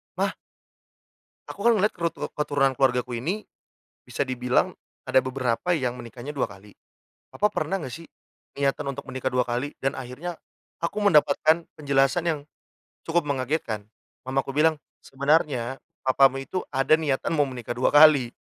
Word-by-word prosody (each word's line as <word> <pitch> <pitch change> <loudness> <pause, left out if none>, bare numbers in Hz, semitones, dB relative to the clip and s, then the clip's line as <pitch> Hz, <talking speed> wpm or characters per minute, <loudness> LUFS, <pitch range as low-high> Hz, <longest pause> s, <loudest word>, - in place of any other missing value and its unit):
"Mah - - 0 1.2
aku 200 - -7
kan 235 +2 +5
ngeliat 210 +2 +2
kerut 170 -1 -1 0.2
keturunan 145 -2 +1
keluargaku 125 -2 0
ini 200 +9 -3 0.6
bisa 125 +3 -2
dibilang 125 -1 +1 0.3
ada - - +3
beberapa 130 +6 0
yang 125 -5 -2
menikahnya 120 +3 -8
2 145 -3 -1
kali. 100 +1 -14 0.6
Papa 210 +1 0
pernah 155 +5 -1
enggak 150 -9 -4
sih 165 +3 -9 0.5
niatan 140 0 -1
untuk 140 - -7
menikah 130 0 -4
2 125 -1 +2
kali?" 125 +4 -3
Dan 135 - +2
akhirnya 145 +8 -6 0.4
aku 170 +5 -3
mendapatkan 160 -2 +4
penjelasan 140 +2 +2
yang 165 -3 0 0.7
cukup 170 +1 +2
mengagetkan. 130 -6 -2 0.4
Mamaku 135 +1 -1
bilang, 150 +2 +2 0.2
"Sebenarnya 135 -3 0 0.2
papamu 135 0 +4
itu 185 +7 -4
ada 135 +4 +4
niatan 155 +1 -1
mau 145 - +4
menikah 125 -2 -5
2 125 +4 +1
kali. 145 -5 +7
135 Hz, 145 wpm, -25 LUFS, 125-155 Hz, 1.2 s, kali